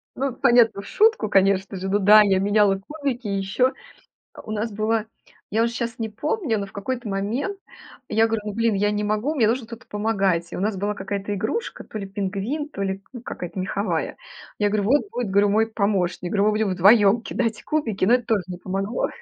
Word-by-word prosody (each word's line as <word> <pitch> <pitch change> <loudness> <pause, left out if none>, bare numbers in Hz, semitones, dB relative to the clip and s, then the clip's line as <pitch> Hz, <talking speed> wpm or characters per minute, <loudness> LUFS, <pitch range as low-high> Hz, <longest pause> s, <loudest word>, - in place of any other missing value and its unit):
Ну, 275 +1 -1
понятно, 235 -4 +4
в - - -14
шутку, 435 - +3
конечно 195 0 +2
же. 190 +1 -4
Ну 200 - +2
да, 210 +2 +8
я 195 -2 +3
меняла 205 0 +3
кубики. 275 -6 -3
Еще 200 +6 +1 0.7
у 215 - -8
нас 220 +1 -2
была 215 +1 0 0.5
я 220 +3 +2
уже 235 - 0
щас 230 0 -3
не 225 -1 -2
помню, 290 - -1
но 200 - -3
в 195 - -15
какой-то 240 +4 -4
момент 215 - -2 0.5
я 220 +1 +3
говорю: 225 -1 -1
"Ну, 210 - -3
блин, 230 +1 +1
я 205 +1 +1
не 210 0 -1
могу, 215 +8 0
мне 235 -7 +3
нужен 235 +2 0
кто-то 230 +1 -10
помогать". 195 -5 0
И - - -5
у - - -3
нас 205 +2 0
была 205 +2 -1
какая-то 200 0 -4
игрушка, 450 - -3
то - - -7
ли 200 - -5
пингвин, 200 +10 -3
то 285 - -7
ли, 195 0 -2
ну, 245 - -8
какая-то 180 -7 -7
меховая. 195 +2 -2 0.4
Я 210 - +3
говорю: 205 0 0
"Вот 290 - +2
будет, 245 -4 -3
говорю, 200 +1 +4
мой 220 +2 +3
помощник". 195 -5 -1
Говорю 200 -1 +2
"Мы 215 - +4
будем 215 -1 0
вдвоем 200 +4 +5
кидать 230 -2 -2
кубики". 245 -12 -1
Но 210 +6 +5
это 250 - -2
тоже 210 -4 +1
не 180 -1 -6
помогло. 195 +5 -2
210 Hz, 210 wpm, -23 LUFS, 195-230 Hz, 0.7 s, да